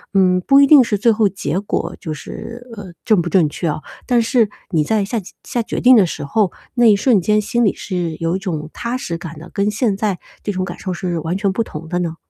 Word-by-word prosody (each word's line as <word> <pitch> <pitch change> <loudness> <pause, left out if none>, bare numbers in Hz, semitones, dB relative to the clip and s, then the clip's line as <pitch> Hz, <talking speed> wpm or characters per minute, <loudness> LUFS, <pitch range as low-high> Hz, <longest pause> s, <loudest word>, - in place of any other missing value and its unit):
嗯， 180 -1 +4
不 275 +9 +5
一 280 - +7
定 280 -2 +8
是 215 -3 -1
最 230 +4 +3
后 215 -2 +2
结 190 -2 -2
果 200 - -3
就 155 - -5
是， 235 - -9
呃， 200 -4 -9
正 215 -5 +4
不 170 - -3
正 170 -2 +4
确 160 +3 -4
啊， 150 - -2 0.3
但 245 -2 +3
是 230 -2 +2 0.2
你 160 -4 +2
在 210 +6 +1
下 230 +4 -3 0.3
下 240 - -2
决 - - -4
定 255 +1 +7
的 210 -5 +6
时 165 - -5
候， 195 +5 +1 0.2
那 240 -1 +3
一 210 - +7
瞬 215 -1 +3
间 210 +4 +2
心 225 +3 0
里 200 - +2
是 175 -4 -3
有 165 +1 0
一 - - -2
种 160 -5 -4
踏 235 +2 -3
实 170 -9 -4
感 165 -2 -9
的， 165 +3 -11
跟 200 +1 +1
现 215 -1 0
在 200 -2 -1 0.2
这 205 - -2
种 185 -1 -2
感 175 - -7
受 185 - -3
是 175 -1 -3
完 165 +4 -2
全 195 0 0
不 230 - 0
同 160 -6 -9
的 175 +1 -1
呢？ 170 -2 -2
195 Hz, 275 characters per minute, -18 LUFS, 175-225 Hz, 0.3 s, 定